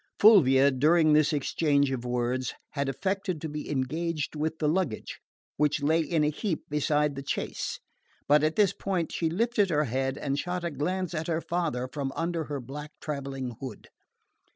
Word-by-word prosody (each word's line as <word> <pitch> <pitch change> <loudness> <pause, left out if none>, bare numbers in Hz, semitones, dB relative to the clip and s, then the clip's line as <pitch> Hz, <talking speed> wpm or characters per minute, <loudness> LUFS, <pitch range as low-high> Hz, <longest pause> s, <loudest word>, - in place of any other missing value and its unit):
Fulvia, 140 - +7
during 155 +4 +4
this 150 0 +4
exchange 145 -1 +1
of 125 -2 -3
words, 125 +1 -1 0.2
had 140 -1 -1
affected 190 +2 -2
to 160 - -4
be 150 0 -6
engaged 155 +4 -2
with 155 +1 -2
the 155 - 0
luggage, 155 - -1 0.4
which 150 -1 +1
lay 160 +3 +3
in 160 0 +1
a 150 - +2
heap 170 +2 -3
beside 150 0 +1
the 135 0 -6
chaise; 140 - -3 0.5
but 150 +1 +5
at 155 +1 +1
this 205 -3 +4
point 180 -4 -2
she 165 - 0
lifted 210 +2 +1
her 150 -2 +2
head 135 +1 -1
and 140 0 -2
shot 180 +2 -3
a 170 - -2
glance 180 +5 -2
at 155 -1 -3
her 165 -1 0
father 165 -9 -1
from 135 0 -4
under 165 -1 -1
her 145 -1 -4
black 145 +4 -7
travelling 135 -4 -4
hood. 130 -5 -8
150 Hz, 175 wpm, -28 LUFS, 135-170 Hz, 0.5 s, Fulvia